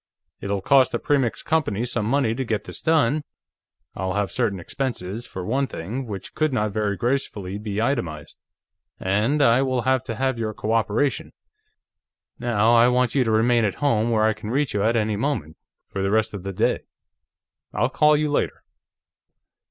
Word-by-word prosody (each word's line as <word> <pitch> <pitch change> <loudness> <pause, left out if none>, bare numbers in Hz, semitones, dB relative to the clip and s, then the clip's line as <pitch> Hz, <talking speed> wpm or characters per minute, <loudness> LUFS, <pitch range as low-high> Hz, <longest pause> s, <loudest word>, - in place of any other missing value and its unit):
It'll 100 -1 -2
cost 135 +1 +4
the - - +2
Premix 135 -3 0
Company 130 -9 0
some 120 -3 -2
money 130 -2 +2
to 130 +3 -2
get 110 -4 -2
this - - -9
done 155 -2 +2 0.7
I'll 95 0 -3
have 105 -1 0
certain 95 -2 -1
expenses, 115 +1 -4
for 90 -1 -6
one 135 +6 0
thing, 120 +9 -5
which 100 -3 -7
could 155 -1 +1
not 105 -5 0
very 105 -1 -1
gracefully 105 -5 -2
be 105 -1 -4
itemized 90 - -2 0.6
and 110 +10 +1
I 120 +1 +5
will 130 -3 0
have 130 0 +2
to - - -4
have 130 -2 -1
your 110 -2 -3
cooperation. 115 +5 0 1.1
Now, 115 -1 +2
I 120 +1 +6
want 125 -1 +2
you 135 - +3
to 115 - -1
remain 115 +2 +3
at 100 - 0
home, 120 -6 +1
where 110 -2 +2
I 110 0 +3
can 105 0 -8
reach 140 +4 0
you 105 - 0
at 115 +3 +2
any 110 -2 0
moment, 110 - -2 0.3
for 100 - -4
the 95 - 0
rest 110 +1 +1
of 100 - -5
the 100 +1 -5
day. 95 - +1 0.9
I'll 120 - +1
call 150 +1 +4
you 150 0 0
later." - - -1
115 Hz, 180 wpm, -23 LUFS, 105-130 Hz, 1.1 s, I